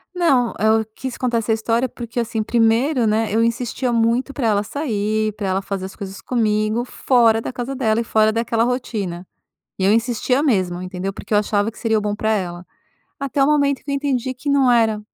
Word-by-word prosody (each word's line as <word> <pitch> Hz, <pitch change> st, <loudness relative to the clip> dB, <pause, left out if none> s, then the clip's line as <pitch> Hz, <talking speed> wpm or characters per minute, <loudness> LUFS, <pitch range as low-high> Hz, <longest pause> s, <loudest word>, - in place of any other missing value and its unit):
Não, 275 Hz, -10 st, +2 dB
eu 220 Hz, +1 st, +3 dB
quis 260 Hz, -2 st, -5 dB
contar 245 Hz, -2 st, 0 dB
essa 225 Hz, 0 st, 0 dB
história, 230 Hz, +3 st, 0 dB
porque, 235 Hz, 0 st, -6 dB
assim, 230 Hz, -1 st, -1 dB
primeiro, 235 Hz, +4 st, +2 dB
né, 220 Hz, 0 st, +1 dB
eu 225 Hz, -, +3 dB
insistia 240 Hz, +2 st, -1 dB
muito 235 Hz, +4 st, +1 dB
pra 240 Hz, -5 st, -1 dB
ela 205 Hz, -1 st, +2 dB
sair 215 Hz, -4 st, -1 dB
pra 205 Hz, -2 st, -4 dB
ela 190 Hz, +1 st, 0 dB
fazer 195 Hz, -1 st, -4 dB
as 190 Hz, -, -9 dB
coisas 195 Hz, -2 st, -7 dB
comigo 215 Hz, -1 st, 0 dB
fora 235 Hz, -3 st, +2 dB
da 225 Hz, -, -5 dB
casa 245 Hz, +3 st, -4 dB
dela 225 Hz, -3 st, +1 dB
e -, -, -2 dB
fora 220 Hz, -1 st, +3 dB
daquela 230 Hz, 0 st, 0 dB
rotina. 215 Hz, -8 st, -3 dB, 0.5 s
E 190 Hz, -, 0 dB
eu 200 Hz, -, +4 dB
insistia 240 Hz, +4 st, +1 dB
mesmo, 185 Hz, -, +1 dB
entendeu, 185 Hz, +1 st, -4 dB
porque 210 Hz, -, -5 dB
eu -, -, +6 dB
achava 205 Hz, +1 st, 0 dB
que -, -, -17 dB
seria 225 Hz, -2 st, +1 dB
o -, -, -1 dB
bom 210 Hz, 0 st, -2 dB
pra 215 Hz, +1 st, -1 dB
ela. 180 Hz, -3 st, -3 dB, 0.5 s
Até 275 Hz, 0 st, 0 dB
o 270 Hz, -, +4 dB
momento 285 Hz, -2 st, +2 dB
que 285 Hz, -, -7 dB
eu -, -, 0 dB
entendi 265 Hz, -2 st, -1 dB
que 285 Hz, +4 st, -4 dB
não 275 Hz, -3 st, +4 dB
era, 225 Hz, -3 st, +3 dB
225 Hz, 210 wpm, -20 LUFS, 210-250 Hz, 0.5 s, eu